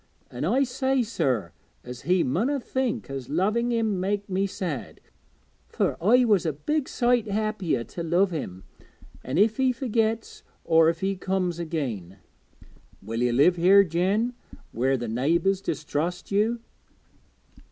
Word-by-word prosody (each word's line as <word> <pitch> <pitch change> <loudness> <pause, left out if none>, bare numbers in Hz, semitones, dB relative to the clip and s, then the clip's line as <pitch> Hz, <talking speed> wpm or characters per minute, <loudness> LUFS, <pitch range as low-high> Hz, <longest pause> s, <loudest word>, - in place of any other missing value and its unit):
An' 125 +4 -4
I 250 +10 +3
said, 265 0 0
sir, 125 - -1 0.3
as 125 0 -8
he 180 -1 +4
munna 230 - 0
think 260 0 -2
as 135 -2 -6
loving 210 +10 +1
him 220 -5 0
made 200 +2 -1
me 195 0 0
sad, 175 -8 -5 0.7
fur - - -1
I 245 +7 +5
was 205 -6 +3
a 160 - 0
big 290 - -2
sight 240 -2 +1
happier 205 - -1
to 170 - -8
love 175 +4 +2
him, 95 - -5 0.6
if 205 - +2
he 260 -1 +3
forgets 225 -3 -1 0.2
or 160 0 +5
if 165 0 -3
he 195 +1 0
comes 185 -2 -2
again.' 125 - -4 0.9
'Will 115 +3 -3
you 125 0 +2
live 145 +9 +4
here; 190 +4 +6
Jen, 195 +8 0 0.4
where 130 +3 +1
the 120 -1 -4
neighbours 170 - +1
distrust 170 +2 -3
you?' 220 +4 +1
185 Hz, 140 wpm, -26 LUFS, 150-220 Hz, 0.9 s, here